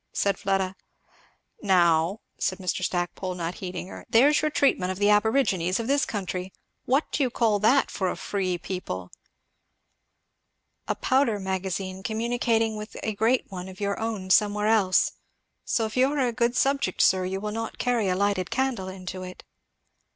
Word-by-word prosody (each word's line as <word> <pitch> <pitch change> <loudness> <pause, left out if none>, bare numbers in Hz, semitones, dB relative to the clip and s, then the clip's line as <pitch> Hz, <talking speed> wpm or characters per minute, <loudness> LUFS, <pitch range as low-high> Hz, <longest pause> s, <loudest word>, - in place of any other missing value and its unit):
said 200 -1 0
Fleda. 195 -1 0 0.9
"Now," 175 -1 +3 0.2
said 185 - 0
Mr. 185 -1 -2
Stackpole, 180 +1 -2
not 170 0 -3
heeding 185 -1 -5
her, - - -9
"there's 280 +6 +5
your 305 - +1
treatment 230 -11 +2
of 185 - -5
the 205 +1 +3
aborigines 210 -5 +2
of 230 - -2
this 280 +3 +2
country 185 -2 -4 0.3
what 270 +5 +1
do - - -1
you 260 - +2
call 225 -3 +1
that, 240 +7 +3
for 190 -2 -1
a - - -3
free 185 -3 -2
people?" 130 - -5 1.8
"A - - 0
powder 255 -5 +1
magazine, 190 0 -3
communicating 225 +1 0
with 210 0 -8
a 215 - -1
great 225 +5 +2
one 185 0 -6
of 190 - -12
your 200 -1 -1
own 215 -4 -3
somewhere 210 +1 +3
else; 200 -4 +3 0.5
so 225 - +1
if 215 - -6
you 260 +2 +3
are 295 - -2
a 250 -4 +1
good 240 +1 +1
subject, 275 -8 +1
sir, 185 0 +4
you 190 +1 -2
will 210 +1 -4
not 225 +1 -4
carry 240 -5 +1
a 180 - +1
lighted 195 -1 0
candle 260 -7 -1
into 185 0 -7
it." 185 0 -9
200 Hz, 170 wpm, -26 LUFS, 185-230 Hz, 1.8 s, there's